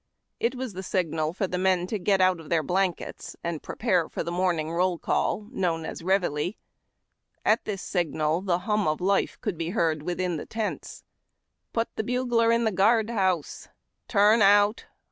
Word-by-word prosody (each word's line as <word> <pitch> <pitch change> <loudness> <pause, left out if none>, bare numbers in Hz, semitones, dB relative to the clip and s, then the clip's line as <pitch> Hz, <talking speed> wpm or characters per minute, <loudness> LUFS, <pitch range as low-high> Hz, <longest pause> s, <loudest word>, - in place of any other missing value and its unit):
It 240 +3 0
was 255 -4 -5
the 185 - -5
signal 165 -4 -1
to 195 - -1
the 180 0 -3
men 185 -1 +2
to 210 +3 -3
get 195 +1 +2
out 185 -2 +3
of 160 - -12
their 165 -2 +2
blankets 180 +2 -2
and 170 -3 -3
prepare 185 -8 0
for - - -3
the 170 - -4
morning 175 -3 0
roll 180 +1 +1
call, 210 +5 -1
known 170 -8 -1
as - - -6
ReveilU. 180 -1 0 0.9
At 220 +2 +3
this 200 -3 -4
signal, 160 -2 0
the 185 -3 +1
hum 210 -3 +1
of 155 0 0
life 195 +2 0
could 195 -6 -3
be 165 0 -2
heard 160 -2 +1
within 175 +1 -2
the - - -7
tents. 220 -2 -4 0.3
" - - -54
Put 230 0 -2
the - - 0
bugler 240 -1 +1
in 230 0 +2
the 220 - +2
guard 220 +4 +3
house! 185 -8 -1
" - - -50
— - - -52
u - - -9
Xurn 210 +3 +6
out! 205 +2 +4
185 Hz, 195 wpm, -26 LUFS, 170-210 Hz, 0.9 s, Xurn